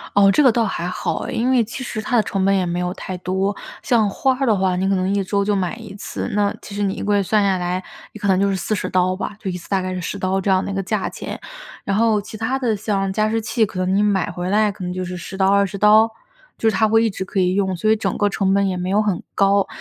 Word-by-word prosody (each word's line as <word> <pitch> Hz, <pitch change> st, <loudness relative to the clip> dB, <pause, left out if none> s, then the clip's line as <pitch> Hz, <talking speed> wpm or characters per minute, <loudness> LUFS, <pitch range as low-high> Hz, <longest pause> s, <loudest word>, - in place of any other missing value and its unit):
哦， 200 Hz, -1 st, +6 dB
这 250 Hz, -, +3 dB
个 270 Hz, -, +6 dB
倒 235 Hz, 0 st, +2 dB
还 185 Hz, -5 st, -2 dB
好 180 Hz, -, -2 dB
哎。 -, -, -4 dB
因 240 Hz, +3 st, 0 dB
为 255 Hz, -2 st, +4 dB
其 230 Hz, +4 st, -5 dB
实 225 Hz, -3 st, -4 dB
它 245 Hz, +3 st, -1 dB
的 225 Hz, -, +4 dB
成 195 Hz, -2 st, -1 dB
本 195 Hz, 0 st, +3 dB
也 185 Hz, -2 st, +1 dB
没 175 Hz, 0 st, -2 dB
有 180 Hz, 0 st, -2 dB
太 185 Hz, -1 st, -6 dB
多， 190 Hz, +2 st, -1 dB, 0.3 s
像 225 Hz, -4 st, +2 dB
花 265 Hz, +6 st, +1 dB
儿 270 Hz, -, +1 dB
的 220 Hz, -, +4 dB
话 185 Hz, -2 st, +1 dB
你 190 Hz, +1 st, 0 dB
可 195 Hz, -, +2 dB
能 185 Hz, +1 st, 0 dB
1 200 Hz, -, +1 dB
周 200 Hz, +1 st, 0 dB
就 205 Hz, +1 st, +1 dB
买 190 Hz, 0 st, -1 dB
1 225 Hz, -3 st, -10 dB
次， 205 Hz, -, -5 dB
那 205 Hz, 0 st, +1 dB
其 205 Hz, -, -10 dB
实 205 Hz, -, -3 dB
你 195 Hz, -1 st, 0 dB
1 -, -, -5 dB
个 205 Hz, -, +1 dB
月 200 Hz, -, +3 dB
算 210 Hz, +2 st, +2 dB
下 195 Hz, -1 st, +2 dB
来， 180 Hz, +1 st, -2 dB, 0.3 s
你 215 Hz, -, -10 dB
可 205 Hz, -, -2 dB
能 185 Hz, -1 st, +3 dB
就 200 Hz, 0 st, +2 dB
是 195 Hz, -, 0 dB
40 195 Hz, +2 st, -2 dB
刀 185 Hz, 0 st, +2 dB
吧， 195 Hz, +2 st, -5 dB
就 190 Hz, -, -3 dB
一 180 Hz, -, -4 dB
次 170 Hz, -, -13 dB
大 195 Hz, -1 st, +1 dB
概 185 Hz, 0 st, -3 dB
是 185 Hz, -, -3 dB
10 180 Hz, +3 st, -4 dB
刀 190 Hz, 0 st, 0 dB
这 195 Hz, -, -2 dB
样 190 Hz, 0 st, +3 dB
的 -, -, -4 dB
一 -, -, -4 dB
个 195 Hz, -, -1 dB
价 195 Hz, +1 st, -2 dB
钱。 -, -, -6 dB, 0.5 s
然 195 Hz, -, -1 dB
后 220 Hz, -2 st, +3 dB
其 215 Hz, +2 st, -9 dB
它 225 Hz, +5 st, -1 dB
的， 245 Hz, -4 st, 0 dB
像 195 Hz, -2 st, -1 dB
加 215 Hz, +2 st, +1 dB
湿 225 Hz, +1 st, 0 dB
器， 220 Hz, +1 st, +1 dB
可 195 Hz, -, -9 dB
能 185 Hz, +1 st, 0 dB
你 200 Hz, -, +3 dB
买 200 Hz, -3 st, +1 dB
回 180 Hz, +1 st, -4 dB
来 210 Hz, +1 st, +3 dB
可 190 Hz, -2 st, -7 dB
能 180 Hz, -, -3 dB
就 185 Hz, 0 st, -3 dB
是 180 Hz, 0 st, -5 dB
10 180 Hz, +2 st, -8 dB
刀、 190 Hz, 0 st, +3 dB
20 200 Hz, 0 st, +2 dB
刀， 215 Hz, +2 st, +6 dB, 0.5 s
就 225 Hz, -, +2 dB
是 215 Hz, -, -2 dB
它 220 Hz, +3 st, +3 dB
会 225 Hz, +1 st, +4 dB
一 225 Hz, -, +2 dB
直 190 Hz, -1 st, -5 dB
可 195 Hz, -, -2 dB
以 180 Hz, 0 st, +2 dB
用， 190 Hz, -1 st, 0 dB
所 215 Hz, +5 st, 0 dB
以 -, -, +5 dB
整 215 Hz, -, -2 dB
个 205 Hz, -, +2 dB
成 195 Hz, -1 st, +1 dB
本 200 Hz, 0 st, +2 dB
也 185 Hz, -1 st, -2 dB
没 180 Hz, +1 st, -3 dB
有 205 Hz, +2 st, +3 dB
很 205 Hz, -5 st, -1 dB
高。 200 Hz, 0 st, +3 dB
200 Hz, 310 characters per minute, -20 LUFS, 185-215 Hz, 0.5 s, 哦